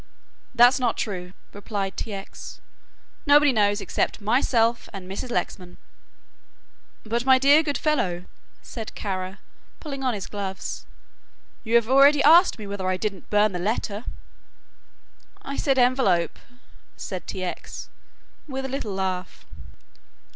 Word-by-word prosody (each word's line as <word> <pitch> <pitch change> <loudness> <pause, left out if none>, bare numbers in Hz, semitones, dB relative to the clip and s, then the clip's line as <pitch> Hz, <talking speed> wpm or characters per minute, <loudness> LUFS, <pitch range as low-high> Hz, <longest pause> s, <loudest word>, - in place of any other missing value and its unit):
"That's 245 +2 +6
not 245 -3 0
true," 180 -3 -4 0.2
replied 200 -1 -4
T. 220 - -5
X.; 195 -1 -8 0.7
"nobody 290 0 +6
knows 205 -2 +2
except - - -1
myself 230 +1 +1
and 195 -3 -8
Mrs. 195 +6 -5
Lexman." 180 -6 -4 1.3
"But 235 +2 -1
my 260 0 +6
dear 280 +4 +6
good 290 -3 -2
fellow," 185 - -1 0.4
said 225 -3 -8
Kara, 190 -1 -4 0.4
pulling 275 -3 -6
on 255 -3 0
his 195 - -5
gloves, 195 -2 -6 0.8
"you 230 +1 0
have 235 -2 +4
already 275 +3 +6
asked 335 +2 +6
me 215 - -8
whether 200 -2 -4
I 185 0 0
didn't 195 -1 -5
burn 210 0 +3
the 180 - -4
letter." 210 +2 -2 1.4
"I 275 - -5
said 270 -2 +1
envelope," 245 -10 +2 0.6
said 185 -2 -6
T. 185 - -5
X., 180 - -6 0.6
with 265 -2 -4
a - - -4
little 230 -7 -4
laugh. 185 -1 -4
215 Hz, 135 wpm, -24 LUFS, 190-260 Hz, 1.4 s, That's